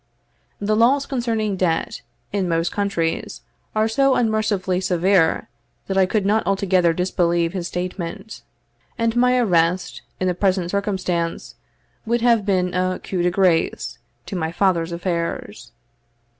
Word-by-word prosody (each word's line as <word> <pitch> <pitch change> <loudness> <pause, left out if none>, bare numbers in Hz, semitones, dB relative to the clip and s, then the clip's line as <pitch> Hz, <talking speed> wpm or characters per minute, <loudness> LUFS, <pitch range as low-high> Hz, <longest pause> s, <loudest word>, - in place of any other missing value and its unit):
The 210 +1 0
laws 260 +5 +3
concerning 225 -5 -1
debt, 170 -3 -1 0.3
in 195 -3 0
most 165 +1 0
countries, 185 -5 -2 0.3
are 215 0 +2
so 270 +4 +2
unmercifully 215 -5 0
severe, 180 -2 +2 0.4
that 195 - -3
I 190 -1 +4
could 205 0 0
not 215 +2 +3
altogether 190 -3 +2
disbelieve 170 -1 0
his 180 -3 -3
statement; 180 +4 -5 0.6
and 230 -1 0
my 250 +1 +3
arrest, 180 -5 +1 0.2
in 185 - 0
the 180 - +2
present 185 -1 0
circumstances, 185 -5 -2 0.5
would 235 +1 +1
have 230 -4 +3
been 180 -2 +1
a 185 0 0
coup 185 -2 -3
de 175 - +3
grace 180 -3 +1 0.3
to 200 - -6
my 160 -2 -2
father's 175 -2 +1
affairs. 170 - -4
185 Hz, 135 wpm, -21 LUFS, 175-215 Hz, 0.6 s, I